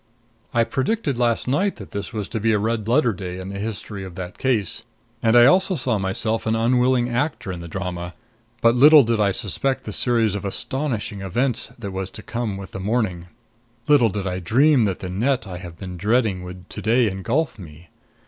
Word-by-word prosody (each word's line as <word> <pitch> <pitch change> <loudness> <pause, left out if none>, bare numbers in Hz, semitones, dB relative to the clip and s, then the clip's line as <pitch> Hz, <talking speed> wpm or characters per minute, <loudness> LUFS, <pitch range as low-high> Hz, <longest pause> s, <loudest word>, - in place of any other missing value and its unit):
I 120 -1 +3
predicted 135 - -1
last 120 -1 +1
night 190 +10 +1
that 100 - -11
this 100 -1 -5
was 105 -4 -4
to 110 - -3
be 110 +1 +2
a - - +3
red 110 +1 -1
letter 120 -1 +3
day 90 -1 -6
in 95 +1 -7
the 100 0 -6
history 105 -1 -5
of 95 -2 -9
that 90 -2 -7
case, 115 -8 0 0.4
and 115 +1 +3
I 120 - +8
also 185 +7 +4
saw 125 -7 0
myself 110 +4 -1
an 110 - +2
unwilling 125 +2 +2
actor 125 -4 -2
in 90 - -6
the 85 - -8
drama. 90 -1 -5 0.5
But 115 0 +5
little 145 +4 +8
did 115 -1 0
I 100 -2 +3
suspect 125 +6 0
the 105 - -6
series 115 -4 +2
of 100 - -4
astonishing 110 -1 -2
events 120 +7 0
that 100 -5 -6
was 95 0 -4
to 110 - -9
come 115 -4 -3
with 95 -1 -9
the - - -6
morning; 95 -4 -1 0.6
little 140 -6 +5
did 100 -1 -4
I 90 -1 -2
dream 125 - +4
that 95 -3 -2
the 90 - -5
net 125 +7 0
I 90 -3 -7
have 85 -2 -10
been 90 0 -7
dreading 105 0 +1
would 90 0 -10
to - - -6
day 115 +2 +3
engulf 110 - -1
me. 85 -1 -12
110 Hz, 205 wpm, -22 LUFS, 95-125 Hz, 0.6 s, I